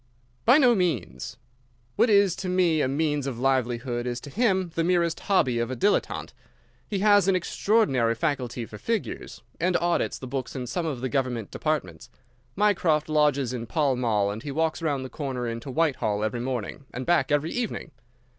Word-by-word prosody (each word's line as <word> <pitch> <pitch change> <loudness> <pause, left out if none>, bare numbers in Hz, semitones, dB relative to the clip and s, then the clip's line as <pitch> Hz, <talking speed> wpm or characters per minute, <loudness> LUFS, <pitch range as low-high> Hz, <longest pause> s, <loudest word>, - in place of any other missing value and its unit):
"By 245 +5 +7
no 250 -5 +6
means. 135 - -2 0.6
What 240 - +3
is 200 -4 +4
to 185 - -4
me 175 -4 +2
a - - +2
means 145 0 0
of 130 -4 -4
livelihood 125 -1 0
is 120 0 -2
to 145 - -10
him 190 - +1
the 165 - 0
merest 170 -1 +1
hobby 130 -12 +2
of 115 0 -1
a 130 - -3
dilettante. 200 - 0 0.5
He 205 - -2
has 205 -3 +5
an 195 - +4
extraordinary 165 - +2
faculty 125 -2 -2
for 105 -1 -11
figures, 225 - -4 0.2
and 180 +1 +2
audits 175 0 0
the - - -8
books 130 0 -4
in 130 -2 -3
some 165 +7 -2
of 135 -6 -3
the 130 - -2
government 125 -6 -2
departments. 145 - -3 0.5
Mycroft 175 -7 +2
lodges 145 -4 +2
in 120 -2 -5
Pall 145 -1 +1
Mall, 105 -5 +1
and 105 +2 -6
he 145 - -6
walks 160 +4 -1
round 145 -5 -1
the - - -4
corner 130 -3 -4
into 115 +3 -5
Whitehall 130 -8 0
every 110 +2 -2
morning 125 +1 -4
and 130 - -5
back 175 -3 +2
every 145 +2 +1
evening. 235 -8 -3
140 Hz, 185 wpm, -26 LUFS, 125-175 Hz, 0.6 s, By